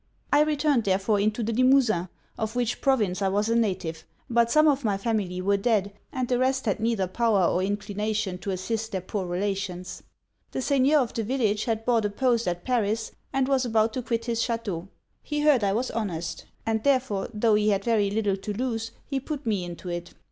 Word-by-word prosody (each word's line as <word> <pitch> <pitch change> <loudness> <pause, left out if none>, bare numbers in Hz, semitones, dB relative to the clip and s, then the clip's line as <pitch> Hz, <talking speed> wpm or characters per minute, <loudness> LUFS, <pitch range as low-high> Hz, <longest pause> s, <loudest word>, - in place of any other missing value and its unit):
_' - - -44 0.3
'I 290 - +6
returned 295 -4 +2
therefore 195 +2 +2
into 215 +3 0
the 230 +2 -1
Limosin, 245 -7 +3 0.3
of 220 +1 -3
which 245 -1 -1
province 210 -9 +1
I 195 - +2
was 205 +3 +1
a 230 - +2
native; 185 -8 -1 0.3
but 235 0 +3
some 305 +5 +5
of 280 -2 +2
my 205 -3 +1
family 195 -4 -2
were 200 +1 +3
dead, 200 -2 +1 0.2
and 255 -3 -2
the 245 0 +1
rest 260 0 +1
had 205 -2 0
neither 225 -3 +1
power 205 0 +2
or 180 - +1
inclination 205 0 -2
to 200 - -5
assist 215 +4 -2
their 190 - -1
poor 185 +1 -4
relations. 185 0 -3 0.5
The - - -1
seigneur 280 +2 +3
of 245 - -3
the 230 - -1
village 215 -3 0
had 225 -1 -1
bought 230 -3 +2
a - - +1
post 235 +1 +1
at 175 0 -2
Paris, 225 -3 0 0.2
and 270 -1 +1
was 270 -2 +2
about 220 -2 +2
to 255 - -2
quit 230 -1 -2
his 230 -1 -1
chateau. 210 -8 -2 0.3
He 295 0 -2
heard 295 -6 +4
I 195 -1 +2
was 245 +5 -1
honest; 170 -7 -3 0.2
and 220 -1 0
therefore, 255 -8 +1
tho' 220 0 +2
he 210 0 +3
had 200 -1 +1
very 215 -3 +2
little 205 -1 0
to 210 +2 -5
lose, 225 0 -2 0.2
he 275 -1 -2
put 290 +1 -5
me 205 -5 0
into 175 +1 -8
it. 175 0 -5
220 Hz, 210 wpm, -26 LUFS, 195-245 Hz, 0.5 s, I